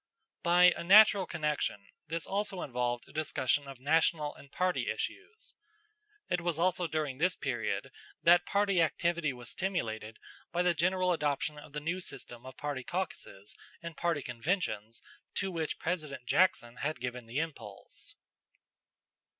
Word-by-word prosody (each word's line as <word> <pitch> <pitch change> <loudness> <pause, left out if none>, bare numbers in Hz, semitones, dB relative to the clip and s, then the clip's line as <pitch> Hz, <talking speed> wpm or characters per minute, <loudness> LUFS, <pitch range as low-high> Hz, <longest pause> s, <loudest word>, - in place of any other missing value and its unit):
By 180 +1 +6
a - - -5
natural 200 +1 +7
connection, 150 -10 -1 0.2
this 165 0 -3
also 195 -2 -2
involved 120 -2 -2
a - - -16
discussion 145 -2 0
of 135 -1 -8
national 155 +1 +2
and 140 - -16
party 180 +2 0
issues. 445 - -5 0.7
It 180 - 0
was 170 -2 0
also 180 0 +1
during 150 -4 -2
this 180 +2 +3
period - - -2 0.3
that 175 +1 +6
party 200 -3 +3
activity 170 -1 +1
was 125 -2 -8
stimulated 110 - -3 0.3
by 175 +1 +1
the 180 -1 +4
general 180 +2 +2
adoption 150 -1 -1
of 145 - -13
the 150 - -2
new 170 +5 -2
system 120 -7 -7
of 130 - -10
party 145 -3 -3
caucuses 165 - -5 0.3
and 170 -1 -6
party 170 -4 0
conventions 120 - -2 0.3
to 195 -1 0
which 160 -3 -2
President 155 -7 -3
Jackson 125 -7 +2
had 155 +2 -2
given 125 -1 -5
the 120 +4 -5
impulse. 160 -1 -5
160 Hz, 145 wpm, -32 LUFS, 130-180 Hz, 0.7 s, natural